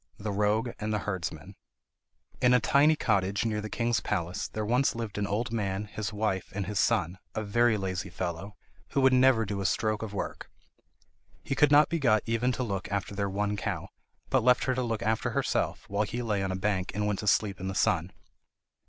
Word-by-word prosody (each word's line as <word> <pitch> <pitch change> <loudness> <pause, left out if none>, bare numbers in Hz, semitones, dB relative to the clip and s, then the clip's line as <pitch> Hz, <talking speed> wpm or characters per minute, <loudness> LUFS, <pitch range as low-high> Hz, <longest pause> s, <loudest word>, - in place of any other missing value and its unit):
] - - -36
The - - 0
Rogue 105 +4 +1
And 110 0 -2
The 105 -1 -1
Herdsman 95 -4 -4 0.9
In 125 0 +5
a - - +5
tiny 145 +6 +4
cottage 100 -5 +1
near 105 -2 -1
the 110 - -6
king's 115 +1 0
palace 85 +4 -2
there 110 0 -4
once 125 +4 +2
lived 115 -3 -4
an 100 - -1
old 105 +5 -1
man, 100 -3 -2
his 105 0 -5
wife, 105 -3 -2
and 100 -1 -2
his 100 +1 -2
son, 95 -5 +1 0.2
a 110 - -1
very 110 +2 +3
lazy 95 -2 -3
fellow, 95 +3 -5 0.4
who 140 - +2
would 130 0 +5
never 130 -3 +5
do 100 0 -3
a - - -3
stroke 110 +1 0
of 110 -2 -5
work. 100 - -5 0.9
He - - -2
could 145 +1 +4
not 150 +1 +7
be 170 - -1
got 110 -6 +3
even 115 +2 +1
to 125 - -2
look 100 -5 -4
after 100 0 -2
their 100 0 -1
one 105 +1 -1
cow, 100 - -4 0.4
but 130 -3 +3
left 125 0 +4
her 130 - +1
to 130 - -1
look 115 -2 -2
after 110 0 0
herself, - - -1
while 100 +1 -1
he 120 +3 -2
lay 105 -4 0
on 95 -1 -1
a - - -2
bank 95 -1 -1
and 105 0 0
went 105 -2 -1
to 105 - -4
sleep 100 -1 +2
in 95 - -4
the 95 - -3
sun. 90 -1 +1
105 Hz, 220 wpm, -29 LUFS, 100-115 Hz, 0.9 s, not